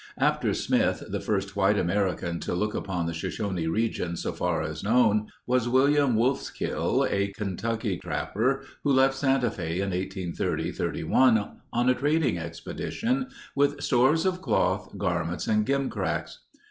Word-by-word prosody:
After - - +2
Smith - - +1
the - - -2
first 100 -1 -2
white 100 +1 +3
American 90 -2 0
to - - -3
look 105 +3 -1
upon 90 -3 -2
the 85 - -2
Shoshone 90 +1 -3
region 90 -2 -1
so - - -3
far - - -1
as - - -5
known, 110 -1 +3 0.2
was 125 -1 +1
William 140 0 +4
Wolfskill, 125 +5 0
a 100 0 +1
Kentucky 105 0 -2
trapper 135 +6 -1 0.2
who 145 - +2
left 135 +1 +5
Santa 135 -3 +1
Fe 85 -5 -4
in 95 +1 -1
1830 95 -1 -2
31 115 -5 +2 0.2
on 120 +1 +1
a - - +6
trading 145 - +1
expedition 230 - -3 0.3
with 145 +1 +2
stores 135 +6 +3
of 185 -1 0
cloth, 95 - 0
garments, 85 -3 -1
and 105 0 +1
gimcracks. 140 0 -1
110 Hz, 145 wpm, -27 LUFS, 95-130 Hz, 0.3 s, a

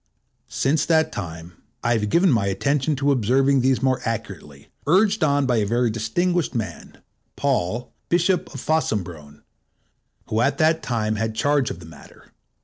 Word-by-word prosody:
Since 145 +2 0
that 160 -1 +3
time, 85 -2 -8 0.2
I 120 0 +2
have 105 -2 0
given 175 - +4
my 110 -5 +1
attention 140 +9 0
to 140 +1 +1
observing 135 +2 +2
these 130 -1 +1
more 130 -1 +1
accurately, 95 - -6 0.2
urged 200 +5 +3
on 145 -2 +2
by 125 -2 +1
a 105 - +1
very 120 +1 +1
distinguished 160 +10 -1
man, 110 -2 -5 0.4
Paul, 120 -3 -1 0.2
Bishop 175 +2 +1
of 135 - -7
Fossombrone, 90 - -2 0.8
who 110 +1 -1
at 135 +2 +1
that 160 +1 +2
time 110 -3 -1
had 110 0 -2
charge 145 +1 +1
of - - -7
the 85 - -12
matter. 80 - -16
125 Hz, 155 wpm, -22 LUFS, 105-145 Hz, 0.8 s, given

